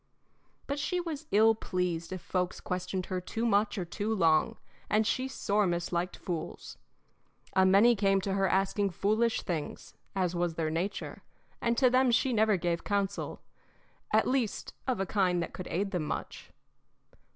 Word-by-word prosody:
But 280 +1 -3
she 360 +5 -1
was 320 -3 -5
ill 220 +2 +5
pleased 180 -5 -2
if 185 -2 -5
folks 180 -1 -2
questioned 180 0 -3
her 185 -1 -3
too 225 +5 -3
much 205 -1 +2
or 185 - -2
too 205 +6 -2
long, 165 -5 +3 0.3
and 215 +1 +3
she 255 +4 0
sore 210 -5 0
misliked 175 +1 -1
fools. 170 -3 -6 0.7
A 190 0 +5
many 205 +6 +6
came 195 -1 +3
to 195 0 -2
her 195 0 +2
asking 195 +1 +1
foolish 215 +5 +1
things, 160 -4 -4 0.2
as 180 -2 0
was 175 -1 -1
their 160 -1 -1
nature, 180 +5 -3 0.4
and 235 0 +1
to 260 - +5
them 255 0 +4
she 245 +2 +2
never 215 -2 +3
gave 170 -1 -1
counsel 200 -1 -2 0.7
at - - +3
least 255 -5 -1
of 255 -5 0
a 195 - 0
kind 180 -2 +1
that - - -7
could 185 - -6
aid 195 +3 -1
them 175 -5 -1
much. - - -5
195 Hz, 165 wpm, -30 LUFS, 180-220 Hz, 0.7 s, many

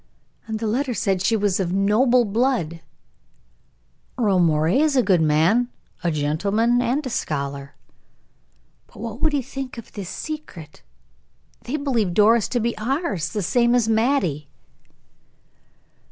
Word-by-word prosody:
"And 220 -1 -3
the 225 - -4
letter 245 +3 -1
said 195 -3 0
she 225 +4 +2
was 205 -3 0
of 180 -2 -1
noble 235 +6 +3
blood." 210 - -1 1.4
"Earle 205 -6 +2
Moray 160 - +2
is 305 -1 +2
a 255 - +4
good 185 -6 +3
man, 165 +11 +3 0.3
a 175 - +1
gentleman, 200 +11 +1
a 260 +4 -1
scholar." 140 - -4 1.1
"But - - -19
what 230 0 -6
would 310 - +3
he 285 -3 0
think 270 0 -7
of 230 - -10
this 195 -4 -7
secret? 240 - -8 0.8
They 280 +5 -2
believe 235 - -1
Doris 220 +1 +4
to 245 - -1
be 235 +1 -1
ours, 215 - -2
the 210 -3 -3
same 240 +5 +2
as 240 -3 +2
Mattie." 220 - 0
220 Hz, 140 wpm, -22 LUFS, 175-245 Hz, 1.4 s, a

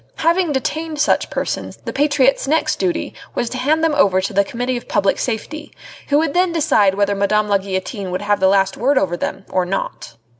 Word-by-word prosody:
Having 335 -1 +1
detained 310 +3 -3
such 300 - +2
persons, - - -4
the - - -4
patriot's 275 -2 +2
next 315 +3 +1
duty 350 -3 -2 0.2
was 235 - -2
to 255 - -4
hand 310 +5 +1
them 325 -2 +2
over 200 -10 +3
to 190 - -3
the 200 - +3
Committee 245 +4 -3
of 240 - -6
Public 200 -1 +1
Safety, 300 +6 -4 0.4
who 285 - +3
would 310 -2 +1
then 360 0 +2
decide 280 - +2
whether 200 0 +1
Madame 210 +1 +1
la 200 -1 +2
Guillotine 190 +1 -4
would 185 +2 -3
have 205 0 +1
the 190 - +4
last 195 0 +2
word 270 +4 +2
over 185 -6 +1
them 185 - -4
or 185 - +1
not. 180 -9 -4
240 Hz, 210 wpm, -19 LUFS, 195-300 Hz, 0.4 s, the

